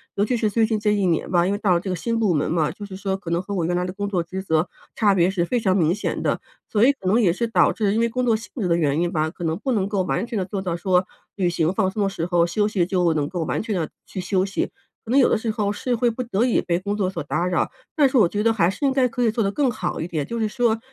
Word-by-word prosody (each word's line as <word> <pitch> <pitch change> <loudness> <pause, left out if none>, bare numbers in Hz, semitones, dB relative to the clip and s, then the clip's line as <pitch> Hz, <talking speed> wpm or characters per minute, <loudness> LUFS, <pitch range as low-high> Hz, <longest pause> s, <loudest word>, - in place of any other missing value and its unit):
尤 200 - +2
其 240 +4 0
是 220 -2 +1
最 225 +2 +2
近 220 -1 -1
这 210 0 +2
一 200 -2 +1
年 165 -3 0
吧， 175 -1 +3
因 190 - +1
为 205 - 0
到 205 -3 +2
了 170 - +3
这 190 - -5
个 185 - -1
新 230 +7 -2
部 215 -5 +2
门 150 -2 0
嘛， 160 -3 +1
就 205 - -9
是 195 -2 -9
说 195 0 -2
可 195 -4 -8
能 170 +1 +1
和 200 +2 -6
我 175 -3 0
原 175 +1 0
来 180 - 0
的 180 - -3
工 200 +2 -4
作 185 -4 0
职 185 +3 -5
责 160 -2 0 0.3
差 205 -3 +3
别 175 -1 +3
是 190 -3 0
非 240 +8 0
常 190 -4 +1
明 170 -3 +3
显 210 - -3
的。 - - 0 0.3
所 215 +1 +4
以 280 - +5
可 265 - -16
能 200 +6 +3
也 180 -6 +3
是 235 +6 -1
导 - - +3
致 205 -3 0
因 220 - +1
为 230 - +3
工 250 +2 -2
作 235 - +3
性 215 -1 -11
质 190 - 0
的 170 - +3
原 150 -1 +1
因 175 0 0
吧， 155 -2 0
可 175 +1 -9
能 160 0 0
不 265 +3 -1
能 200 -3 0
够 200 -3 0
完 185 - -1
全 235 -3 -3
地 185 - -1
做 195 +1 -4
到 175 -3 -2
说 180 +1 +2 0.3
旅 185 -3 +1
行 170 0 0
放 190 -2 +1
松 210 - -3
的 - - +2
时 170 -4 -3
候， 175 -1 +2
休 205 +4 +1
息 205 -5 +1
就 180 -2 +1
能 150 -2 0
够 175 0 -3
完 - - -1
全 220 -2 -3
地 165 -4 -2 0.2
去 185 - -6
休 185 +1 +1
息， 195 - -2 0.4
可 225 - -6
能 270 - +5
有 260 - +6
的 - - +2
时 220 +1 -2
候 210 -1 -1
是 250 +4 -2
会 240 +1 +2
不 235 +2 -3
得 235 -1 0
已 250 - +2
被 170 -1 0
工 200 +2 -2
作 195 -3 0
所 175 -3 -4
打 170 +4 -1
扰。 180 -1 0 0.2
但 295 -3 +4
是 265 - +1
我 220 - +6
觉 205 - -2
得 225 +1 +3
还 180 -6 +3
是 195 +9 -3
应 270 - +2
该 265 -1 +3
可 245 +1 -4
以 235 - +3
做 225 0 0
得 195 - 0
更 275 +4 +1
好 220 - -3
一 160 - -3
点， 155 -5 -2
就 235 +7 -4
是 220 - +1
说 230 0 +1
195 Hz, 360 characters per minute, -23 LUFS, 175-220 Hz, 0.4 s, 有